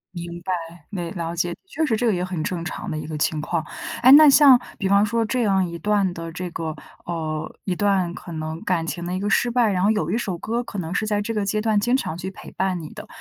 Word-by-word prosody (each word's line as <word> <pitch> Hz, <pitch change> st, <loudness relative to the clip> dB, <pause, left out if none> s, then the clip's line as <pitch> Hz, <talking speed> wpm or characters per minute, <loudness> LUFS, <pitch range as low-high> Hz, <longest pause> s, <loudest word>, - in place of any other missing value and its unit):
明 170 Hz, 0 st, -6 dB, 0.4 s
白， 170 Hz, +1 st, -16 dB
没 175 Hz, -5 st, -4 dB
了 170 Hz, -2 st, -4 dB
解， 175 Hz, 0 st, -1 dB
确 320 Hz, -3 st, -1 dB
实 240 Hz, -7 st, +1 dB
这 240 Hz, +2 st, 0 dB
个 220 Hz, -, +3 dB
也 180 Hz, -1 st, -1 dB
很 180 Hz, -4 st, -3 dB
正 170 Hz, -2 st, -3 dB
常 -, -, -5 dB
的 155 Hz, -, -3 dB
一 155 Hz, -, -5 dB
个 155 Hz, -, -5 dB
情 155 Hz, +1 st, 0 dB
况。 160 Hz, +2 st, -2 dB, 0.4 s
诶， 255 Hz, +2 st, +8 dB
那 305 Hz, +1 st, +10 dB
像 280 Hz, -3 st, +8 dB, 0.2 s
比 195 Hz, -, 0 dB
方 200 Hz, +1 st, +5 dB
说 230 Hz, +1 st, 0 dB
这 240 Hz, +2 st, 0 dB
样 195 Hz, -3 st, +2 dB
一 170 Hz, -, -6 dB
段 200 Hz, +1 st, +1 dB
的 165 Hz, -1 st, -6 dB
这 180 Hz, +1 st, -5 dB
个 160 Hz, -2 st, -4 dB, 0.3 s
呃， 155 Hz, -3 st, -4 dB
一 185 Hz, -, -1 dB
段 190 Hz, -3 st, +1 dB
可 170 Hz, -, -9 dB
能 155 Hz, 0 st, -4 dB
感 170 Hz, -3 st, 0 dB
情 175 Hz, +1 st, -4 dB
的 180 Hz, -, -3 dB
一 185 Hz, -, -1 dB
个 205 Hz, +2 st, -1 dB
失 240 Hz, +2 st, +2 dB
败， 235 Hz, -3 st, +3 dB
然 185 Hz, -1 st, 0 dB
后 205 Hz, -, +4 dB
有 215 Hz, -1 st, 0 dB
一 -, -, +1 dB
首 190 Hz, -7 st, -3 dB
歌 235 Hz, +6 st, -2 dB
可 205 Hz, -, -6 dB
能 170 Hz, 0 st, -4 dB
是 215 Hz, -, 0 dB
在 210 Hz, -1 st, 0 dB
这 225 Hz, +2 st, -3 dB
个 210 Hz, -1 st, 0 dB
阶 210 Hz, +2 st, 0 dB
段 215 Hz, -2 st, +2 dB
经 240 Hz, +5 st, +2 dB
常 165 Hz, -11 st, -2 dB
去 190 Hz, +2 st, -5 dB
陪 -, -, -11 dB
伴 185 Hz, -2 st, -1 dB
你 155 Hz, -, -8 dB
的。 -, -, -9 dB
185 Hz, 290 characters per minute, -23 LUFS, 170-215 Hz, 0.4 s, 那